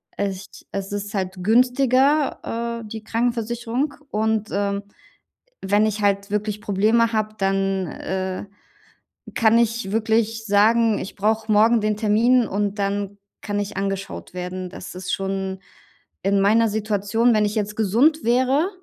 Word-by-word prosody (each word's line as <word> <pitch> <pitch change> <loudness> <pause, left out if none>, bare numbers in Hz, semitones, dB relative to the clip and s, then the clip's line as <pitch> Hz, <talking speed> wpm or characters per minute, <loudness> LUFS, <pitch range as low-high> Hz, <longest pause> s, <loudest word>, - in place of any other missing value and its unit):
Als 195 -1 -3
ch - - -15
also, 195 +1 -4
es 205 0 -3
ist 205 +1 -8
halt 185 -1 -3
günstiger, 250 0 +2
äh, - - -9
die 220 0 -7
Krankenversicherung. 235 +4 -1 0.2
Und, 220 0 0
ähm, 200 0 -1 0.8
wenn 205 +2 +2
ich 215 -1 -2
halt 200 0 +1
wirklich 210 0 -2
Probleme 220 +4 +2
habe, 215 -1 -1
dann, 195 -1 0
äh, 190 +3 -4 0.9
kann 225 0 +4
ich 230 -3 0
wirklich 225 0 0
sagen, 220 +2 +4
ich 195 - -6
brauche 220 +2 0
morgen 225 +2 +5
den 215 0 0
Termin 230 +3 +3
und 205 +1 -2
dann 200 0 -2 0.2
kann 205 -1 -2
ich 205 0 -5
angeschaut 195 -2 -4
werden. 180 0 -5
Das 180 0 -9
ist 185 0 -4
schon 190 0 -3 0.6
in 195 0 +2
meiner 220 +3 +4
Situation 215 +2 +1
wenn 215 - +3
ich 205 0 -1
jetzt 210 -1 -2
gesund 240 +10 +2
wäre, 260 +8 +2
210 Hz, 145 wpm, -22 LUFS, 200-230 Hz, 0.9 s, morgen